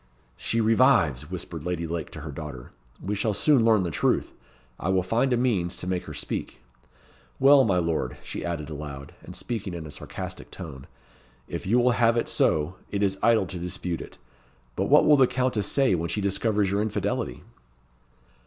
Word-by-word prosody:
"She 115 - -1
revives!" 110 - +3
whispered 80 -3 -5
Lady 90 -1 -2
Lake 85 0 -4
to 80 - -9
her 75 0 -6
daughter. 70 -4 -8 0.3
"We 100 - -3
shall 105 0 0
soon 140 +1 +4
learn 110 -4 +4
the 85 - -2
truth. - - 0 0.5
I 90 - -2
will 95 -1 +2
find 115 +8 +1
a 125 - +3
means 105 -9 0
to - - -6
make 90 -1 -2
her - - -8
speak. - - -4 0.8
Well, 135 0 +7
my 95 -4 +2
lord," 85 -2 -1
she - - -5
added 80 -3 -4
aloud, 70 -2 -7
and - - -10
speaking 105 -6 -4
in 85 -2 -6
a 75 - -8
sarcastic - - -7
tone, 70 -7 -9 0.6
"if - - -5
you 115 +5 +3
will 125 0 +4
have 115 0 +3
it 115 - 0
so, 80 +4 +1
it 100 0 -1
is 95 -1 0
idle 115 -4 +4
to 90 0 -7
dispute 85 -1 -4
it. - - -11 0.6
But - - 0
what - - +5
will 150 - +6
the 130 -2 +6
Countess 125 -6 0
say, 135 -6 +3
when 85 -1 -1
she 105 - -1
discovers 100 0 +1
your 100 +1 +1
infidelity?" 110 -1 -2
95 Hz, 190 wpm, -26 LUFS, 85-115 Hz, 0.8 s, Well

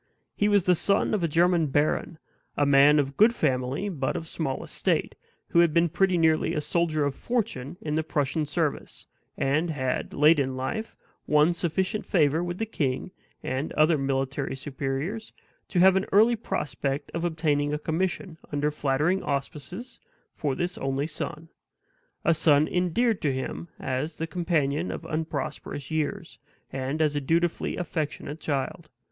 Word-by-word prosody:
He 205 - +2
was 205 -3 +4
the 180 - +4
son 200 +5 +2
of 205 -5 0
a - - +3
German 170 +1 +3
baron; 150 +3 0 0.4
a 145 - +3
man 140 +1 +6
of 140 -1 0
good 230 +3 +5
family, 130 - 0
but 145 -9 -2
of 165 - -4
small 150 -5 -3
estate - - -1 0.4
who 170 - +3
had 170 -2 +4
been 170 0 +4
pretty 185 +2 +2
nearly 160 -1 +2
a - - +1
soldier 155 -2 0
of 140 - -1
fortune 175 - -3
in 150 - -3
the 160 - +2
Prussian 150 0 -1
service, 155 -1 -2 0.3
and 155 +5 +1
had, 130 -5 -2
late 150 +2 +5
in 130 -1 -1
life, 220 +13 -4 0.3
won 150 +3 +4
sufficient 185 +5 -1
favor 160 -1 +2
with 175 0 -4
the 225 - -1
king 145 - -2 0.3
and 130 +4 -2
other 155 +2 +4
military 135 -1 -1
superiors, 140 - -4 0.3
to 180 - 0
have 190 +1 +7
an 190 - +1
early 225 +4 +5
prospect 140 - -3
of 170 - -2
obtaining 155 -4 0
a 150 - 0
commission, 165 +1 -2
under 145 +1 0
flattering 150 +6 +1
auspices, 150 - -4 0.3
for 140 -3 -2
this 175 +4 -2
only 135 +1 -1
son 155 0 -5 0.8
a 170 - +5
son 155 -1 +4
endeared 185 +5 +1
to 145 - +1
him 130 +5 -4
as 135 +4 -3
the 165 - -2
companion 165 -2 0
of - - -6
unprosperous 155 -2 -4
years, 160 +4 -3 0.3
and 135 +4 -1
as 150 -1 +1
a 145 - 0
dutifully 165 +4 0
affectionate 155 -2 -4
child. 155 +3 -3
155 Hz, 160 wpm, -26 LUFS, 140-175 Hz, 0.8 s, have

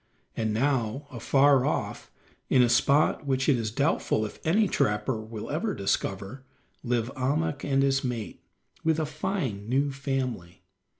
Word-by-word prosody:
And 110 -1 -1
now 130 +2 0
afar 135 +2 +3
off, - - -2 0.4
in 125 - +5
a 120 - +3
spot 140 +4 +3
which 130 -1 +1
it 145 - +5
is 115 -2 -2
doubtful 110 -3 0
if 105 - -8
any 205 +7 +3
trapper 105 - 0
will 110 -1 -7
ever - - -1
discover, 130 +7 -2 0.4
live 120 0 -1
Ahmuk 140 +2 -1
and 135 -1 +2
his 135 0 +2
mate, 120 -5 -4 0.4
with 160 -1 +2
a 155 - 0
fine 150 - -3
new 140 +3 +1
family. 130 -10 -4
130 Hz, 145 wpm, -27 LUFS, 115-140 Hz, 0.4 s, in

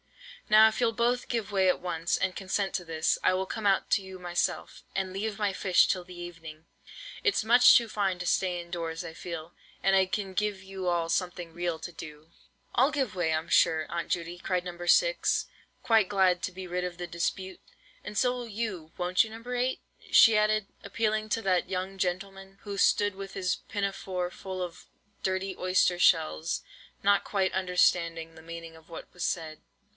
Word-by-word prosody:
Now 215 +1 +8
if 220 +2 -2
you'll 235 -2 +3
both 240 +2 0
give 230 -4 -2
way 190 -2 +3
at - - +1
once, 175 -1 -1
and 185 0 -1
consent 195 0 -2
to 180 - -2
this, 160 -2 0
I - - +4
will 190 +1 -1
come 220 +2 -5
out 195 -1 +2
to - - +3
you 190 -1 -9
myself, 175 -1 -2
and 190 -1 -2
leave 205 +2 -3
my 205 -2 0
fish 185 -2 +4
till 185 -2 -1
the 180 -1 -12
evening. 165 -2 -9 0.6
It's 410 - +2
much 240 +3 +7
too 235 - 0
fine 200 -4 -1
to 180 - -4
stay 180 -1 +1
in 170 0 -10
doors, 165 -2 -4
I 160 - -7
feel; 165 0 -7 0.3
and 195 0 +3
I 190 -1 +4
can 190 +1 -3
give 205 0 -1
you 190 -1 -6
all 170 -1 +1
something 175 -1 -2
real 175 -1 -2
to 175 - -7
do." 155 0 -11 0.4
"I'll 265 +5 +4
give 270 -9 -1
way, 175 -3 0
I'm 160 +1 -1
sure, 160 -1 +3
Aunt 170 0 -4
Judy," 170 0 -3
cried 180 -1 -1
No. 175 -1 -6
6, - - +3 0.4
quite 225 -6 +3
glad 190 -3 +3
to - - -3
be 185 0 -8
rid 180 +1 -2
of 180 -1 -4
the 175 0 -5
dispute; 180 +2 -3 0.4
"and 210 - -7
so 250 +3 +3
will 245 -1 -6
you, 200 -7 -4
won't 180 0 +3
you, 225 - -7
No. 230 +2 -10
8?" 250 +1 0 0.3
she 225 - +8
added, 215 0 +2 0.2
appealing 215 +1 -1
to 225 +1 -1
that 185 -2 +1
young 190 +1 -3
gentleman, 195 +1 -3
who 200 -1 -5
stood 205 0 +3
with 195 0 -8
his 185 -2 0
pinafore 195 -3 -2
full 185 -1 -5
of 175 -1 -8 0.4
dirty 190 0 -1
oyster 185 -1 +2
shells, 165 -1 +2 0.4
not 200 0 +4
quite 190 -2 0
understanding 170 -3 +1
the 160 - -14
meaning 165 0 -9
of 160 +1 -18
what 165 - -8
was 175 - -6
said. 160 -3 -3
185 Hz, 195 wpm, -28 LUFS, 175-205 Hz, 0.6 s, Now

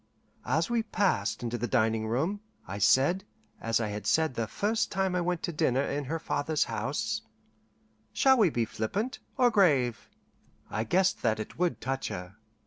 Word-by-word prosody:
As - - +1
we 235 -1 +1
passed 180 - 0
into 120 0 -2
the 120 - -1
dining 110 0 +1
room, 160 - -1 0.3
I 100 +2 -5
said, 135 - +4 0.4
as 115 0 +1
I 110 -2 -1
had 105 0 -5
said 160 -3 +2
the 115 -2 -2
first 215 - -1
time 190 -1 0
I 180 - +1
went 175 -1 -1
to - - -1
dinner 135 -2 +2
in 140 0 -2
her 160 +5 -2
father's 155 -1 0
house, 145 - -2 0.9
"Shall 265 -2 +4
we 205 -5 +5
be 120 -6 0
flippant, 200 - -3 0.2
or 250 -2 +4
grave?" 145 - +2 0.6
I 110 - -1
guessed 185 - +2
that 110 -2 +1
it 110 - -7
would 180 -1 +1
touch 135 +1 -2
her. 90 +2 -6
140 Hz, 175 wpm, -29 LUFS, 115-190 Hz, 0.9 s, we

